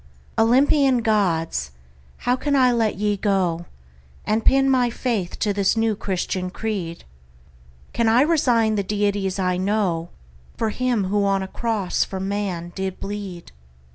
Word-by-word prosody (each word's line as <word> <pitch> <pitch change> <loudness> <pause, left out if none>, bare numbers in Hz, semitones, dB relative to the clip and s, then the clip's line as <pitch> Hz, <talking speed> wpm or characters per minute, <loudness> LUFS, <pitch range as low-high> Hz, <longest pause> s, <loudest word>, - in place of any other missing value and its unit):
Olympian 260 +2 +3
Gods! 170 - 0 0.6
how 245 +1 +3
can 285 +2 -1
I 255 -2 +5
let 225 -4 0
ye 210 0 +1
go 185 -4 0 0.6
And 220 +1 0
pin 270 0 +4
my 255 -2 +3
faith 225 -7 -2
to 210 -2 0
this 200 +2 +1
new 225 -1 +1
Christian 185 -1 -3
creed? 185 -5 -4 0.9
Can 230 -1 +2
I 235 +3 +5
resign 245 -9 +2
the 205 -2 0
deities 200 -1 -1
I 180 -1 0
know 185 -4 0 0.5
For 225 -1 0
him 245 -3 0
who 200 +2 0
on 195 -1 +1
a - - -5
cross 215 -3 -1
for 190 - -6
man 190 -3 -3
did 190 -1 -4
bleed? 195 -4 -6
205 Hz, 145 wpm, -22 LUFS, 190-230 Hz, 0.9 s, I